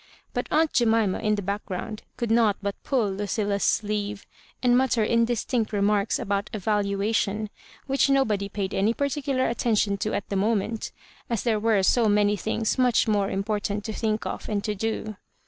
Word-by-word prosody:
But - - -2
aunt 315 0 +2
Jemima, 225 -5 +2
in 215 -1 +1
the 205 - -4
background, 200 +2 -4 0.2
could 235 -2 -2
not 225 -3 +3
but 200 0 -3
pull 235 -7 +1
Ludlla's 200 +1 -1
sleeve, 210 -1 -1 0.4
and 245 -1 +4
mutter 250 -3 +2
indistinct 230 +1 +1
remarks 205 0 +1
about 200 0 -2
a - - -2
valuation, 205 +1 0 0.3
which 275 +1 +2
.nobody 215 -8 +2
paid 200 -1 -3
any 210 +4 +1
partici^ar 280 -2 0
attention 215 -3 +1
to 215 - -1
at 205 - -3
the 200 - -2
moment^ 215 +2 0 0.4
as 235 -4 -1
there 225 -3 +1
were 215 -3 +2
so 225 +3 +3
many 205 0 +3
thin^ 220 +5 -1
much 250 -2 +3
more 205 -2 +1
important 205 +1 -2
to 220 - -3
think 215 0 -1
of - - -5
and 205 -2 -1
to 210 - -1
do. 215 0 -3
215 Hz, 170 wpm, -25 LUFS, 200-230 Hz, 0.4 s, and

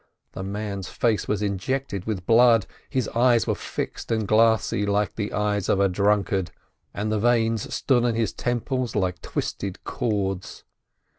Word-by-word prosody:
The - - -7
man's 100 -1 -4
face 115 -4 0
was 105 -1 0
injected 100 +1 -2
with 100 -5 -3
blood, 115 -2 +5 0.2
his 130 -3 -1
eyes 120 -1 +3
were - - +1
fixed - - -5
and 110 -2 0
glassy 110 -1 +3
like 105 0 0
the 105 -2 -3
eyes 105 -2 -1
of 100 - +3
a 100 - +4
drunkard, 100 -1 +1 0.4
and 105 +2 -3
the 110 - +1
veins 115 -1 +1
stood 125 -3 +2
on 120 -2 +1
his 115 -3 0
temples 125 +1 -2
like 90 -5 -1
twisted 95 -2 -4
cords. 95 -4 -2
105 Hz, 155 wpm, -24 LUFS, 100-115 Hz, 0.4 s, blood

